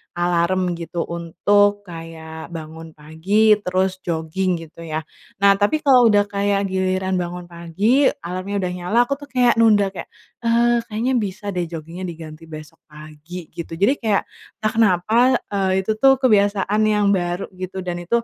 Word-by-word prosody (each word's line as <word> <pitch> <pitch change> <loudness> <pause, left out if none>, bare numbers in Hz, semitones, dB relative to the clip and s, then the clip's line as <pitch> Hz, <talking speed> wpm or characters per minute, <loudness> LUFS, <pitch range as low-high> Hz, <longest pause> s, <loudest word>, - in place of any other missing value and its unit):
alarm 175 +1 +1
gitu 170 0 -3
untuk 205 +5 +1
kayak 165 -2 -9
bangun 160 -1 -9
pagi, 170 +9 +1
terus 185 0 -1
jogging 175 +2 -2
gitu 165 +1 -16
ya. 160 -1 -4 0.4
Nah, 200 0 +5
tapi 300 +10 +1
kalau 255 -5 +6
udah 205 -2 +4
kayak 200 -1 -1
giliran 185 0 0
bangun 175 0 -5
pagi, 200 - +1 0.2
alarmnya 185 +3 -4
udah 180 - -1
nyala, 180 +5 -3
aku 280 +3 -3
tuh 285 - -11
kayak 250 -3 +2
nunda 205 -3 +4
kayak, 190 - -8 0.3
"Eee, 235 0 +2
kayaknya 230 +4 -1
bisa 205 0 -4
deh 180 -2 -2
jogging-nya 165 +3 -7
diganti 165 -1 -10
besok 155 -1 -11
pagi," 155 +3 -11
gitu. 165 -1 -7
Jadi 205 +11 +2
kayak, 215 -4 +1 0.4
entah 215 - +1
kenapa, 225 +4 +3 0.2
eee, 190 -1 0
itu 220 - -1
tuh 270 +2 +6
kebiasaan 205 -4 +2
yang 210 -1 +2
baru 175 0 -2
gitu, 185 0 -6
dan 175 -1 -4
itu 230 +7 0
185 Hz, 160 wpm, -21 LUFS, 170-210 Hz, 0.4 s, kalau